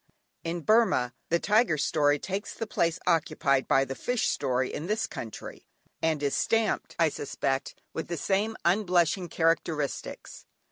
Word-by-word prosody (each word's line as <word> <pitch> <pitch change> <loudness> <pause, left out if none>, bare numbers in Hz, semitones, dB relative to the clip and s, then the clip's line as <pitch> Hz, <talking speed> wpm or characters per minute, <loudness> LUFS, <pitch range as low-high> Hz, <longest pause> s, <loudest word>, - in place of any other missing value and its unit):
In 170 +1 -3
Burmah 190 - +3 0.2
the 170 - +3
Tiger 210 -3 +3
story 145 0 +2
takes 195 +7 -4
the 225 - -3
place 170 -5 0
occupied 155 -5 +2
by 135 0 +4
the 135 - -4
fish 245 - 0
story 130 -2 0
in 155 - -4
this 215 +2 0
country, 110 - -8 0.3
and 160 -2 0
is 140 - +1
stamped, 225 -2 0
I 165 -1 +4
suspect, 135 -2 -3
with 160 - -4
the 170 - -3
same 205 +7 0
unblushing 180 -1 +2
characteristics. 160 -3 -2
165 Hz, 145 wpm, -28 LUFS, 145-195 Hz, 0.3 s, by